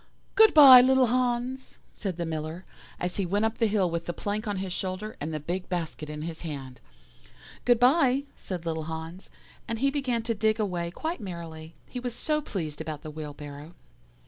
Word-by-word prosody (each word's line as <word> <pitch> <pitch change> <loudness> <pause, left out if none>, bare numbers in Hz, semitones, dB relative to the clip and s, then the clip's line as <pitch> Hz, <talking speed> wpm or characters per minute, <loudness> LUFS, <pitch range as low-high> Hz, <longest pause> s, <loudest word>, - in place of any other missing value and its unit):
"'Good 440 -4 +6
bye, 270 -4 +11
little 260 0 +5
Hans,' 250 +1 -1 0.2
said 190 -5 -4
the 170 - -2
Miller, 160 +2 -5 0.3
as 180 0 -2
he 200 - +1
went 205 +4 +1
up 220 0 -2
the 225 - +4
hill 205 -3 +2
with 170 0 -3
the 175 - -2
plank 210 +5 -3
on 205 -1 -1
his 185 -1 -3
shoulder, 190 +4 -4
and 155 +2 -3
the 155 - -3
big 175 +5 -4
basket 165 -4 -4
in 150 0 -5
his 165 -1 -6
hand. 135 -6 -7 0.8
"'Good 245 -2 +4
bye,' 265 +1 +4
said 180 -3 -6
little 160 -1 -2
Hans, 160 +3 -7 0.4
and 230 - -2
he 275 +4 +2
began 255 -5 -1
to 230 - 0
dig 215 +1 +1
away 180 -5 -1
quite 315 - -4
merrily, 165 -4 -8
he 250 - -6
was 245 -1 -4
so 305 -1 0
pleased 160 - -5
about 155 -1 -6
the 155 - -7
wheelbarrow. 150 +1 -8
185 Hz, 195 wpm, -27 LUFS, 160-240 Hz, 0.8 s, bye